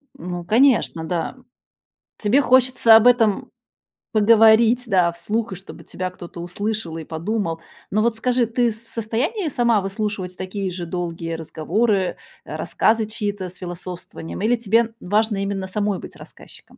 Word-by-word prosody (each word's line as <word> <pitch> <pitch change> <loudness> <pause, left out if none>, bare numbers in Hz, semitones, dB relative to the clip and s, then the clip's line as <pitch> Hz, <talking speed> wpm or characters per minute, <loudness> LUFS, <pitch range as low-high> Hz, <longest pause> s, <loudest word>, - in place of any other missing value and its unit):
Ну, 175 +1 -6
конечно, 225 -5 +3
да. 170 +7 -3 0.8
Тебе 225 +7 +3
хочется 255 -3 +5
об 225 +2 +6
этом 225 -5 +3 0.6
поговорить, 225 +2 +5
да, 180 -5 +3
вслух, 210 +6 -3
и - - -2
чтобы 195 - -12
тебя 185 0 -4
кто-то 175 -1 -10
услышал 180 -1 -4
и 160 - -6
подумал. 165 0 -3 0.3
Ну, 215 +2 +1
вот 230 0 +1
скажи, 245 +1 +1
ты 235 0 +1
с 215 - -10
в - - -17
состоянии 255 - -2
сама 235 -5 +2
выслушивать 195 -2 -4
такие 190 +1 -4
же 175 -1 -5
долгие 165 -1 -4
разговоры, 185 +5 0 0.3
э, - - -6
рассказы 220 0 +1
чьи-то 205 -3 -4
с 180 - -14
философствованием, 175 -1 -8
или 235 +4 +2
тебе 230 +1 +1
важно 210 +1 0
именно 195 -1 -3
самой 205 0 -1
быть - - -10
рассказчиком? - - -14
210 Hz, 150 wpm, -22 LUFS, 180-230 Hz, 0.8 s, об